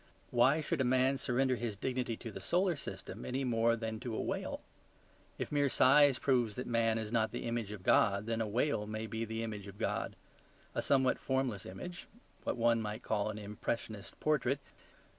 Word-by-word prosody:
Why 130 +6 +4
should 155 -1 -1
a - - +4
man 130 +2 +3
surrender 130 0 +1
his 115 -2 -3
dignity 125 +1 -2
to 115 - -7
the 95 - -7
solar 175 - +1
system 95 -5 -7
any 130 +2 -2
more 115 -2 +3
than 110 -1 -4
to 120 -2 -4
a - - -2
whale? - - -3 0.8
If - - -4
mere 145 -1 +3
size 140 +1 +6
proves 120 -5 +2
that 125 - -4
man 115 -1 +2
is 110 -1 -4
not 110 -2 +2
the - - -5
image 115 -3 -2
of 105 -3 -8
God, 100 +1 +4
then 115 0 -1
a 110 - 0
whale 110 0 0
may 110 +1 -3
be 110 +1 -3
the 110 +1 -3
image 105 -3 -5
of 100 0 -10
God; - - -2 0.6
a - - 0
somewhat 130 -2 +3
formless 130 -6 -1
image; 170 - -7 0.4
what - - -1
one 115 0 +3
might 105 +1 -4
call 105 -1 0
an 110 - -4
impressionist 105 0 -4
portrait. 140 -3 +1
115 Hz, 195 wpm, -34 LUFS, 110-130 Hz, 0.8 s, size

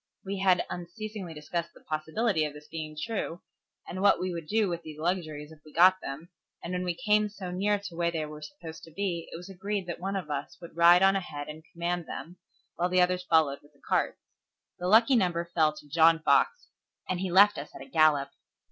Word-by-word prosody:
We 195 0 -3
had 185 -2 +3
unceasingly 185 0 -7
discussed 170 +3 -4
the - - -15
probability 160 +4 0
of 150 -1 -3
this 150 0 -12
being 155 -1 -6
true, 195 -4 -4 0.4
and 185 - -5
what 205 - +5
we 185 -1 -2
would 165 -2 -6
do 215 +2 +2
with 170 -2 -3
these 155 -2 -10
luxuries 155 -3 -3
if 160 - -14
we 155 - -15
got 185 +4 +5
them, 150 +5 -7 0.3
and 175 - -4
when 180 0 -1
we 175 -1 -1
came 210 +3 +2
so 195 -3 -7
near 205 +3 +1
to 200 -4 -9
where 170 0 +1
they 160 -2 -2
were 150 0 -9
supposed 165 0 -9
to 165 - -15
be, 170 -1 -3
it - - -6
was 175 +2 -10
agreed 195 +1 -3
that 175 -1 -5
one 195 +2 -3
of 175 -6 -4
us 145 0 -4
would 170 - -12
ride 170 +2 +7
on 195 0 +5
ahead 150 -6 -4
and 155 +1 -9
command 175 0 -2
them, 170 +6 -7 0.4
while 175 +1 +1
the 185 0 +3
others 180 0 +2
followed 155 -4 +3
with 145 +1 -23
the 140 - -28
carts. - - +1 0.6
The 180 - -2
lucky 230 +7 +6
number 175 -5 0
fell 155 -2 +4
to 150 -1 -13
John 165 +2 +5
Fox, 475 - +2 0.4
and 185 - -1
he 190 0 -2
left 200 +1 +6
us 145 - -7
at - - -9
a - - -14
gallop. 145 -2 +3
175 Hz, 225 wpm, -29 LUFS, 155-190 Hz, 0.6 s, ride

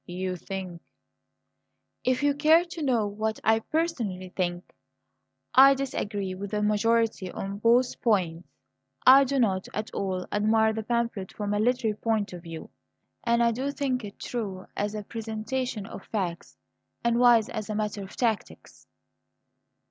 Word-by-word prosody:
"You 185 +1 -3
think 180 -2 -6 0.6
" - - -53
"If 255 +2 -1
you 290 0 +4
care 315 +4 +5
to 340 -1 -8
know 245 -7 +2
what 215 +2 -2
I 220 0 +4
personally 225 - -2
think 175 -1 -3 0.8
I 275 +1 +8
disagree 205 -8 -3
with 195 +2 -6
the 210 +1 -1
majority 215 -2 +1
on 200 +1 -5
both 240 +3 +3
points. 180 -7 +1 0.6
I 270 +2 +9
do 275 +1 -1
not 195 -7 +1
at 215 +2 -3
all 185 -2 -2
admire 220 +1 +3
the 220 - -3
pamphlet 230 -4 -2
from 205 -1 -3
a 205 - +1
literary 225 -2 +1
point 220 -4 -1
of 175 - -8
view, 165 -1 -9 0.5
and 235 0 +3
I 235 - +4
do 260 +5 -2
think 270 -4 -1
it 205 -1 -8
true 200 -6 -5
as 205 +1 -2
a 210 - -4
presentation 225 +1 -4
of 195 - -9
facts 180 -6 -4 0.5
and 235 0 +2
wise 240 -3 +6
as 215 -1 -5
a 215 - -2
matter 210 -1 -2
of 195 0 -9
tactics." 225 -4 -3
215 Hz, 155 wpm, -27 LUFS, 195-240 Hz, 0.8 s, I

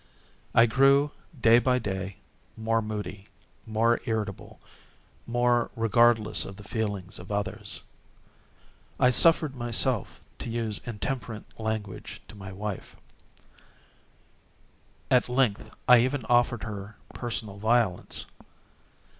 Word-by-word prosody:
I 115 - +8
grew, 140 +4 +4 0.3
day 115 0 +6
by 125 0 +2
day, 95 -4 -4 0.4
more 115 0 +1
moody, 105 -2 -6 0.4
more 115 +2 +2
irritable, 110 -4 -4 0.7
more 120 0 +2
regardless 115 -1 +3
of 100 - -8
the 105 - -11
feelings 100 -4 -3
of 90 +3 -10
others. 105 +1 -3 1.2
I 125 - +5
suffered 155 0 +5
myself 120 -2 0 0.2
to - - -5
use 115 -3 -2
intemperate 115 0 -4 0.2
language 110 -3 -4
to - - -12
my 95 -2 -9
wife. 100 +1 -6 2.2
At 125 -1 +4
length, 125 -5 +1 0.2
I 125 -1 +8
even 130 0 0
offered 120 -1 +2
her 105 -1 -7 0.2
personal 110 -4 -4
violence. 110 -3 +1
115 Hz, 105 wpm, -27 LUFS, 105-120 Hz, 2.2 s, I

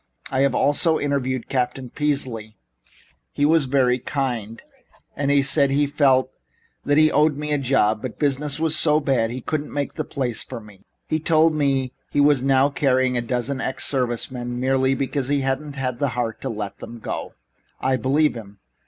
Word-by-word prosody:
"I 130 - 0
have 140 -2 +2
also 160 +3 +3
interviewed 130 -3 -2
Captain 125 -1 -2
Peasley. 125 -7 -3 0.7
He 145 - 0
was 160 -1 +3
very 130 -2 +2
kind. 120 -5 -3 0.6
He 140 0 +2
said 140 0 +3
he 145 +2 +2
felt 135 -3 +2 0.5
that 145 0 +2
he 155 0 +5
owed 150 -1 +3
me 150 0 -4
a 145 - +1
job, 110 -5 +1
but 130 - -6
business 145 0 -1
is 160 -1 +1
so 150 -1 +3
bad 135 -6 +1
he 125 +2 -5
couldn't 150 +3 -3
make 145 -1 -4
a - - +1
place 125 -5 -3
for - - -7
me. 105 -3 -17 0.2
He 155 - 0
told 160 0 +3
me 135 -4 0 0.2
he - - -1
is 145 -4 +3
now 135 +1 +3
carrying 130 -2 +1
a 120 - +1
dozen 125 +3 -2
ex 130 - -1
service 125 -3 -1
men 120 -1 -5
merely 130 +1 +2
because 135 0 -2
he 140 0 +1
hasn't 135 +2 -2 0.2
the 140 - +1
heart 120 -2 -3
to 135 - -3
let 105 -3 -5
them 120 - -9
go. 115 - -6 0.4
I 130 0 +1
believe 140 +5 +2
him." 105 -4 -10
135 Hz, 180 wpm, -22 LUFS, 125-145 Hz, 0.7 s, he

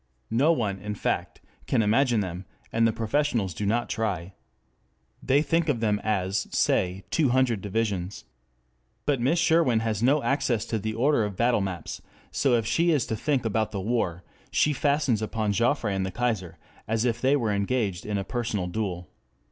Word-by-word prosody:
No 135 +8 +4
one, 105 -11 -1
in 105 +2 -5
fact, - - -2 0.3
can 115 -4 +2
imagine 115 +1 +3
them, 90 -1 -5 0.3
and 115 0 +4
the - - +2
professionals 115 - 0
do 100 +5 -3
not 120 +3 +1
try. 100 -5 -2 0.9
They 140 +3 +3
think 165 0 +1
of 130 -6 +1
them 105 -2 +1
as, 95 -2 0
say, 90 +1 +1
two 150 -5 +2
hundred 120 -4 +2
divisions. 100 -2 -2 0.8
But 140 -4 +1
Miss 140 +8 +2
Sherwin 160 -9 +3
has 110 -2 -1
no 140 +4 +3
access 120 -5 0
to 110 -1 -2
the 110 +2 -3
order 130 +1 +3
of 105 -3 -4
battle 120 -2 +2
maps, 95 -4 -4
and - - -29 0.2
so 135 -3 +2
if 115 -2 0
she 165 +9 +2
is 150 -7 +2
to 110 - -2
think 135 +2 0
about 110 0 0
the 100 - -3
war, 95 -5 -1 0.3
she 150 - +2
fastens 140 -5 +1
upon 110 -1 -1
Joffre 115 +1 +1
and 95 -1 -1
the 95 - -2
Kaiser 95 -7 -2 0.3
as 110 +2 0
if 115 -2 0
they 135 +2 +4
were 115 -7 0
engaged 100 -2 -1
in 105 -1 -2
a 100 - -1
personal 115 -5 -2
duel. 90 -2 -3
115 Hz, 185 wpm, -26 LUFS, 100-130 Hz, 0.9 s, No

